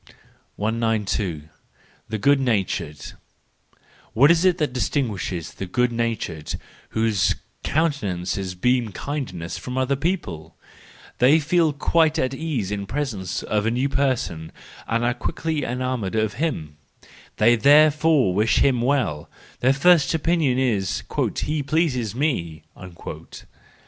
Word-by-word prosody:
192. 105 -6 -1 0.7
The 110 - -2
Good 140 +6 +3
natured\ 95 - -2 1.0
—What 140 +7 +6
is 170 0 +3
it 180 -2 +4
that 150 -5 -1
distinguishes 105 - -2
the 95 - -6
good 125 +6 +1
natured, 115 -10 -3 0.4
whose 110 -4 +2 0.3
countenances 95 - -1
beam 125 +4 +1
kind¬ 145 0 -4
ness, 85 -2 -6
from 125 0 -6
other 130 +1 +1
people? 120 - -3 0.6
They 140 +6 +6
feel 160 +1 +2
quite 160 +2 +2
at 130 -3 0
ease 135 -10 -3
in 100 -1 -3
presence 110 -11 -3
of 105 0 0
a - - +3
new 125 +4 0
person, 125 - -1 0.4
and 115 +1 0
are 120 - +2
quickly 155 +2 -3
enamoured 125 -5 -2
of 110 -1 0
him; 80 - -2 0.6
they 115 +2 +5
therefore 150 - +4
wish 105 +4 +2
him 130 -4 +3
well; 120 - 0 0.3
their 130 - +4
first 160 +3 +4
opinion 160 -5 +1
is: 115 -8 0 0.2
" - - -2
He 150 0 -1
pleases 135 - 0
me." 100 - -2
125 Hz, 125 wpm, -23 LUFS, 100-145 Hz, 1.0 s, What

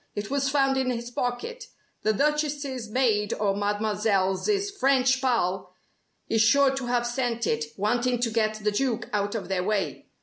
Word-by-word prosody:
It 205 +2 -4
was 275 -1 +1
found 270 -1 +2
in 260 -1 0
his 240 -1 -4
pocket. 245 - -3 0.4
The 215 - +2
Duchess's 285 -2 -1
maid 215 -4 +1
or 200 -2 0
Mademoiselle's 205 - 0 0.2
French 260 -7 +2
pal 195 -8 0 0.5
is 225 -1 +2
sure 270 +5 +5
to 270 -2 -4
have 240 0 +1
sent 240 -1 -1
it, 150 0 0
wanting 240 +4 +1
to 235 -2 +1
get 215 -1 +1
the 210 - +2
Duke 235 +1 -1
out 205 +1 -1
of 200 -5 -4
their 185 -1 -1
way. 205 0 -2
235 Hz, 165 wpm, -26 LUFS, 210-265 Hz, 0.5 s, sure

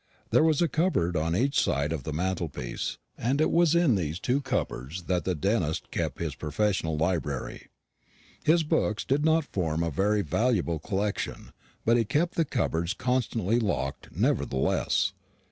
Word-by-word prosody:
There - - +5
was 160 0 +3
a - - +3
cupboard 155 - +1
on 80 +2 0
each 135 +8 +2
side 70 +3 0
of 80 - -3
the - - -3
mantelpiece, 85 -6 -3 0.2
and 130 +5 0
it 155 - +3
was 170 -1 +4
in 170 -7 +4
these 85 -4 -1
two 130 +6 0
cupboards 90 - -3
that 90 -1 -1
the 95 - 0
dentist 85 -1 -1
kept - - -2
his 80 -4 -3
professional 80 +2 -1
library. 80 -1 -2 0.7
His 165 +1 +4
books 110 -8 0
did 140 +3 +1
not 160 +1 +3
form 80 - -1
a 85 - -1
very 100 +6 +1
valuable 85 - +1
collection, 100 +5 -3 0.3
but 115 +1 +4
he 115 - +3
kept 165 - +1
the 165 - +1
cupboards 90 - -1
constantly 120 -3 0
locked 85 - -2
nevertheless. 65 0 +1
95 Hz, 160 wpm, -28 LUFS, 80-130 Hz, 0.7 s, There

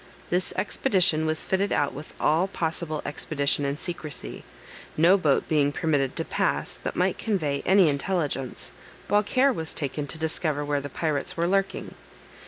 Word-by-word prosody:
This 180 +1 +1
expedition 185 -4 +2
was 155 0 0
fitted 195 +1 0
out 145 - +1
with 150 +3 -9
all 165 +5 +3
possible 160 -4 -3
expedition 145 -1 0
and 140 +1 -1
secrecy, 160 -4 -5 0.5
no 170 +5 +6
boat 155 -8 +2
being 145 -2 +2
permitted 145 -4 0
to 165 - 0
pass - - 0
that - - -5
might - - +1
convey 155 -10 -1
any 190 -2 +6
intelligence, 145 -3 -2 0.4
while 205 0 +4
care 255 +6 +3
was 160 -7 -4
taken 145 0 -2
to 160 - -1
discover 155 -2 -1
where 145 -1 0
the 145 - -6
pirates 150 +1 -2
were 170 - +1
lurking. 195 +1 -1
160 Hz, 160 wpm, -26 LUFS, 145-185 Hz, 0.5 s, no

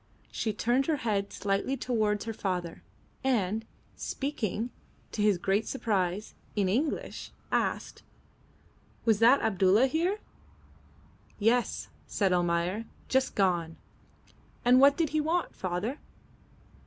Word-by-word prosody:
She 220 - -1
turned 240 +6 +1
her 320 - +2
head 200 -3 0
slightly 200 +7 -1
towards 215 -5 0
her 225 - -3
father, 180 -5 -3 0.4
and, 220 -5 +1 0.3
speaking, 245 -4 -3 0.4
to 210 - -3
his 205 -3 +4
great 195 +4 0
surprise, 205 -5 -1 0.2
in 200 -3 +2
English, 265 +11 -2 0.2
asked - - -1 1.0
"Was 220 -3 +4
that 240 +5 +6
Abdulla 200 +2 +4
here?" 335 +9 +1 1.2
"Yes," 230 +3 +1 0.2
said 195 -3 +1
Almayer 175 +4 0 0.2
"just 265 0 +1
gone." 175 -4 +1 0.9
"And 250 +1 +6
what 280 +1 +7
did 330 -3 +1
he 310 0 +1
want, 335 +3 -1
father?" 190 - -3
215 Hz, 115 wpm, -29 LUFS, 195-260 Hz, 1.2 s, what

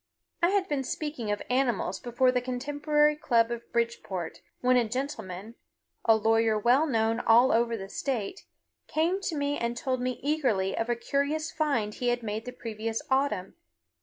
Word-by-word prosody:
I 345 - +4
had 390 -1 +1
been 285 -2 -1
speaking 280 -4 -4
of 205 0 -1
animals 240 -7 0
before 250 +1 +2
the 250 -1 0
Contemporary 290 +4 +1
Club 235 -5 +2
of 235 0 -6
Bridgeport 230 -7 -2 0.2
when 255 0 +3
a 240 -3 +2
gentleman, 220 -6 -4 0.5
a 225 - +6
lawyer 225 0 +3
well 250 +8 +3
known 225 -3 +1
all 240 +3 +5
over 230 0 +2
the 195 -2 -7
state, 250 - -3 0.4
came 340 +5 +1
to 350 -4 -2
me 285 0 -1
and 235 0 -2
told 255 0 -1
me 250 -1 -2
eagerly 260 -11 +1
of 225 +1 -2
a 240 - +2
curious 285 +6 -1
find 260 -10 0
he 245 - -3
had 240 0 +1
made 215 +1 -3
the 250 - -5
previous 225 -1 -4
autumn. 265 -9 +1
245 Hz, 170 wpm, -28 LUFS, 225-285 Hz, 0.5 s, a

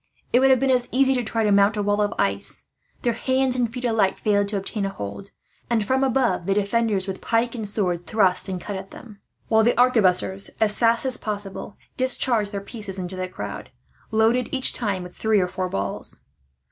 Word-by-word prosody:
It 245 - +6
would 270 +1 +4
have 260 -2 +5
been 270 0 +2
as 245 -1 +1
easy 265 +1 +3
to 250 -2 -1
try 225 0 -1
to 210 - +2
mount 200 +2 +4
a 205 - 0
wall 205 +1 +1
of 205 0 +1
ice. - - -2 0.4
Their 240 - +2
hands 260 +2 +1
and 240 -3 0
feet 250 +1 -5
alike 220 -5 +2
failed 205 -1 +1
to 205 0 -2
obtain 200 +2 -3
a 195 - 0
hold, 150 - -7 0.4
and 225 -3 +1
from 260 +4 +1
above 245 -9 +1
the 195 - +2
defenders, 205 -1 +1
with 190 -1 -5
pike 230 +1 0
and 220 -4 -4
sword, 180 -5 -2
thrust 195 -3 +2
and 185 -1 -3
cut 205 +3 -6
at 190 0 -7
them; 210 -4 -13 0.3
while 220 -1 +4
the 235 +1 +2
arquebusiers, 195 -6 +2
as 210 -1 +1
fast 230 +1 +3
as 255 -2 +1
possible, 205 -1 -6 0.2
discharged 245 -5 +1
their 200 -2 -4
pieces 205 -2 -6
into 185 0 -4
the 185 0 -3
crowd, 105 - -7 0.4
loaded 225 +2 +2
each 260 -1 +4
time 200 -6 -2
with 180 - -11
three 220 -2 +2
or 180 - +1
four 185 0 -3
balls. 100 - -4
210 Hz, 210 wpm, -23 LUFS, 195-240 Hz, 0.4 s, It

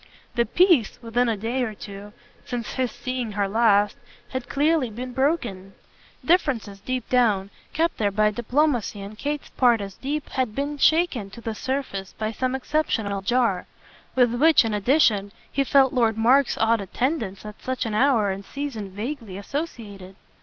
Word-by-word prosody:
The 235 0 +1
peace, 345 - +3
within 235 +1 +1
a 225 - 0
day 230 +5 -2
or 220 -4 -2
two 200 0 -9 0.3
since 240 -3 -4
his 255 -2 0
seeing 255 -4 -4
her 200 -1 0
last 205 -1 +3 0.3
had 260 -2 -5
clearly 295 -2 +2
been 245 +3 -6
broken; 240 - -1 0.5
differences, 255 - +1
deep 255 +3 -3
down, 210 -6 +2 0.2
kept 330 +2 0
there 205 -2 +2
by 210 +1 +2
a - - -4
diplomacy 240 -2 0
on 200 +2 -8
Kate's 290 +5 -4
part 240 -3 +4
as 200 -1 -6
deep, 290 +7 -4
had 255 -5 -2
been 285 +1 -3
shaken 315 - +3
to 200 - -11
the 225 -1 -3
surface 215 -6 -4
by 215 0 -3
some 255 +3 -1
exceptional 230 -8 -1
jar; 230 -3 +1 0.5
with 245 -2 +4
which, 300 +1 +5
in 220 - -1
addition, 210 -3 +3 0.2
he 275 - +1
felt 270 -1 +4
Lord 230 -4 +2
Mark's 250 +4 +4
odd 225 0 +2
attendance 215 - -2
at 210 0 -9
such 260 -1 -2
an 220 - -3
hour 220 -4 +3
and 195 +1 -5
season 245 -5 -5
vaguely 215 0 -6
associated. 205 - -6
235 Hz, 165 wpm, -24 LUFS, 205-270 Hz, 0.5 s, which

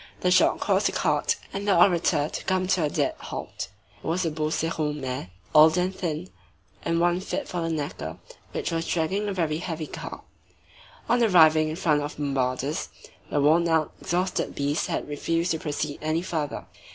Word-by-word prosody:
The 180 - +2
shock 185 - +4
caused - - +2
the - - -1
cart - - +1 0.2
and 200 +1 -4
the 195 - +4
orator 170 -5 +4
to - - -6
come 185 -1 +1
to 185 -4 +3
a - - 0
dead - - 0
halt. - - -6 0.4
It - - -6
was 175 +3 0
a 165 - 0
Beauceron 155 -1 -1
mare, 130 -8 -4 0.2
old 155 +2 +7
and 185 +1 0
thin, 155 - -3 0.5
and 165 0 +1
one 175 +1 +3
fit 190 - -3
for 175 - -3
the 165 - -1
knacker, 155 -3 -4 0.3
which - - -2
was 165 0 -2
dragging 190 +5 0
a - - -1
very 160 -5 0
heavy 165 -3 -4
cart. - - -8 0.8
On 240 0 +3
arriving 160 -7 +6
in 155 - -3
front 155 -4 +2
of 145 +1 -5
Bombarda's, 135 0 -1 0.4
the 145 - +1
worn 160 +4 +4
out, 160 -2 +1
exhausted 180 +2 -1
beast 145 +2 0
had - - -2
refused 165 +4 -1
to 160 - -1
proceed 150 -1 -3
any 155 +2 0
further. 155 -5 -3
160 Hz, 185 wpm, -26 LUFS, 150-175 Hz, 0.8 s, old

